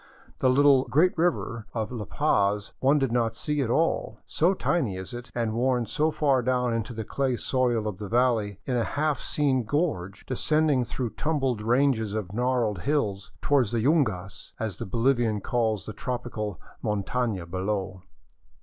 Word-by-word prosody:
The 130 Hz, -, +3 dB
little 135 Hz, 0 st, +5 dB
" -, -, -13 dB
Great 160 Hz, +9 st, +3 dB
River 160 Hz, -9 st, -1 dB
"of 110 Hz, 0 st, -2 dB
La 115 Hz, -4 st, -4 dB
Paz 100 Hz, +3 st, +1 dB
one 140 Hz, +3 st, +4 dB
did 135 Hz, -4 st, 0 dB
not 115 Hz, -2 st, +1 dB
see 150 Hz, +4 st, -1 dB
at 125 Hz, -, -1 dB
all, 165 Hz, +7 st, +1 dB
so 175 Hz, +5 st, +2 dB
tiny 130 Hz, -, 0 dB
is 95 Hz, +5 st, -7 dB
it 120 Hz, +1 st, -7 dB
and 115 Hz, -2 st, -1 dB
worn 125 Hz, +1 st, +1 dB
so 155 Hz, +7 st, +1 dB
far 140 Hz, -4 st, +2 dB
down 125 Hz, -1 st, +1 dB
into 115 Hz, +1 st, -2 dB
the 110 Hz, -1 st, -4 dB
clay 130 Hz, +3 st, -1 dB
soil 120 Hz, -5 st, 0 dB
of 105 Hz, -3 st, -5 dB
the 105 Hz, -, -5 dB
valley 115 Hz, -5 st, +1 dB
in 130 Hz, -, -1 dB
a 120 Hz, -, +2 dB
half 145 Hz, +2 st, -1 dB
seen 135 Hz, -4 st, +1 dB
gorge 110 Hz, -, -2 dB
descending 150 Hz, 0 st, +2 dB
through 120 Hz, 0 st, -4 dB
tumbled 135 Hz, -3 st, -1 dB
ranges 115 Hz, -2 st, +2 dB
of 100 Hz, -3 st, -4 dB
gnarled 120 Hz, -4 st, 0 dB
hills 105 Hz, -9 st, -1 dB
toward 140 Hz, -5 st, +3 dB
the 115 Hz, +1 st, -1 dB
yiingas, 110 Hz, -, 0 dB
as 110 Hz, -5 st, -3 dB
the -, -, -4 dB
Bolivian 115 Hz, 0 st, +1 dB
calls 110 Hz, -2 st, -1 dB
the 110 Hz, -, -6 dB
tropical 115 Hz, -, -4 dB, 0.2 s
montana, 105 Hz, -1 st, -1 dB
below. 95 Hz, +1 st, -3 dB
120 Hz, 170 wpm, -26 LUFS, 105-135 Hz, 0.2 s, little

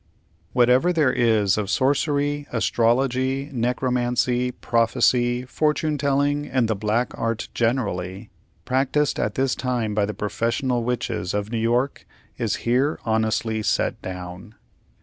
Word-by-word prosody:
Whatever 125 Hz, +7 st, +4 dB
there 150 Hz, -7 st, +2 dB
is 110 Hz, -5 st, +2 dB
of 100 Hz, -2 st, -3 dB
Sorcery, 145 Hz, +2 st, +1 dB
Astrology, 130 Hz, +4 st, +1 dB
Necromancy, 125 Hz, 0 st, 0 dB
Prophecy, 120 Hz, +1 st, +1 dB
Fortune 150 Hz, +2 st, 0 dB
telling, 145 Hz, +1 st, +1 dB
and 130 Hz, -3 st, +1 dB
the 110 Hz, -, 0 dB
Black 110 Hz, +4 st, 0 dB
Art 115 Hz, -1 st, -2 dB
generally, 105 Hz, -5 st, -2 dB, 0.3 s
practised 135 Hz, +3 st, +1 dB
at -, -, -1 dB
this 130 Hz, -1 st, +1 dB
time 120 Hz, -5 st, -2 dB
by 105 Hz, -1 st, +2 dB
the 105 Hz, -, -5 dB
professional 115 Hz, +4 st, -1 dB
Witches 115 Hz, -6 st, -2 dB
of 105 Hz, +1 st, -2 dB
New 115 Hz, -, -1 dB
York, 120 Hz, +5 st, 0 dB, 0.3 s
is -, -, -1 dB
here 130 Hz, +6 st, +1 dB
honestly 110 Hz, 0 st, 0 dB
set -, -, 0 dB
down. 90 Hz, +3 st, -8 dB
120 Hz, 125 wpm, -23 LUFS, 110-135 Hz, 0.3 s, Whatever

